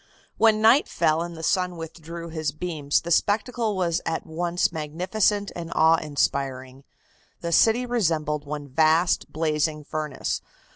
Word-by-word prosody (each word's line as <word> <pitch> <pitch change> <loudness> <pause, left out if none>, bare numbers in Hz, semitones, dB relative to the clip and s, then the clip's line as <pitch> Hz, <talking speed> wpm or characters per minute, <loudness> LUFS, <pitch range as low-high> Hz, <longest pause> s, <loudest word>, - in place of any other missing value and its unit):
When 220 -1 +4
night 240 +6 +6
fell 155 +1 +1
and 170 -1 -5
the 160 - -8
sun 180 0 0
withdrew 165 +1 -8
his 155 -2 -2
beams 155 -3 -1
the 170 - -6
spectacle 220 +3 +1
was 175 -2 0
one 165 - -1
at - - -6
once 170 +2 -1
magnificent 185 +7 -1
and 170 -1 -6
awe 160 +1 +5
inspiring. 135 -3 -2 0.6
The 170 - -3
city 225 +8 +4
resembled 160 -11 0
one 145 0 -6
vast 160 +5 +2
blazing 155 -1 -1
furnace. 150 -1 -3
165 Hz, 145 wpm, -25 LUFS, 150-180 Hz, 0.6 s, night